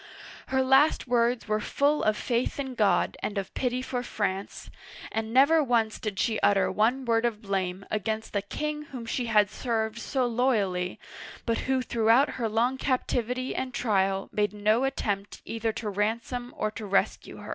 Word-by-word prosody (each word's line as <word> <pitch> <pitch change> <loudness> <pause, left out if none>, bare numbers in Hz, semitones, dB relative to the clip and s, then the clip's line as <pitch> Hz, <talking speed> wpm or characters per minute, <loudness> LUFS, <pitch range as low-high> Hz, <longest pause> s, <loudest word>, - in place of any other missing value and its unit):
Her 265 0 +1
last 270 +4 +4
words 240 -1 +1
were 215 0 +1
full 285 +7 +1
of 215 0 +2
faith 245 +3 -1
in 265 -2 -3
God 210 -4 +2
and 205 - -3
of 195 -1 -4
pity 250 0 -1
for 250 -1 -2
France, 200 -5 -4 0.4
and 225 0 -2
never 285 +6 +5
once 230 -4 +1
did 210 -3 -4
she 220 +2 +1
utter 200 -1 +3
one 245 +5 +1
word 230 -1 +2
of 235 -3 0
blame 190 -1 -2
against 220 +1 -2
the 200 - +1
king 300 +8 -4
whom 255 -5 -8
she 240 +1 -2
had 210 -2 +4
served 220 -1 -2
so 260 +1 -1
loyally, 210 -7 0 0.5
but 230 -1 0
who 260 -1 +2
throughout 235 +4 +3
her 225 - +1
long 240 +4 +1
captivity 255 -1 -1
and 260 -1 -4
trial 195 -4 +1
made 210 0 0
no 215 +5 +2
attempt 205 -7 -3
either 225 0 -2
to 225 -1 -5
ransom 230 +4 -2
or 215 - -1
to 215 -1 -7
rescue 195 0 0
her. - - -10
230 Hz, 175 wpm, -27 LUFS, 210-255 Hz, 0.5 s, never